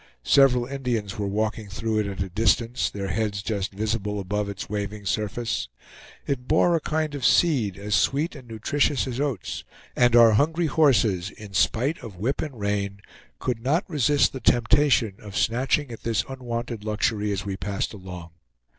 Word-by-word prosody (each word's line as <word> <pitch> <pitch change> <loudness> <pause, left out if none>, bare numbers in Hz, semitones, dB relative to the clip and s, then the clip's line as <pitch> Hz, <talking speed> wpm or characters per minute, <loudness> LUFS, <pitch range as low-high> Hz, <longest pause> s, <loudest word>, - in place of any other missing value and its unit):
Several 125 - +5
Indians 120 -7 -3
were 100 - -1
walking 110 +1 -2
through 110 +2 -1
it 105 - 0
at 95 -1 -3
a 95 - -7
distance, 115 +5 +1
their 100 -1 -5
heads 100 +1 -1
just 100 -3 -2
visible 105 0 -2
above 105 +2 -2
its 100 0 -6
waving 105 0 -4
surface. 110 - -2 0.6
It 130 -3 -3
bore 170 +3 +4
a 165 - 0
kind 155 0 -1
of 140 -3 -5
seed 125 - +3
as 105 +1 -4
sweet 145 +10 +2
and 130 -4 -12
nutritious 130 +6 0
as 130 -1 -4
oats; 140 -9 -3 0.3
and 120 -1 +4
our 115 -1 +8
hungry 160 +10 +2
horses, 115 - +3
in 105 -1 -12
spite 125 - +1
of 105 -5 -8
whip 120 +9 -1
and 140 -7 -6
rein, 100 -1 -2 0.4
could 120 -3 -2
not 150 - +1
resist 145 - +2
the 130 - -5
temptation 120 -4 +3
of 105 -2 -7
snatching 130 +3 +1
at 115 - -8
this 115 -1 0
unwonted 120 -4 -5
luxury 105 -1 0
as 100 -1 -3
we 100 -1 -3
passed 100 +3 -3
along. 90 -4 -9
110 Hz, 170 wpm, -25 LUFS, 100-130 Hz, 0.6 s, our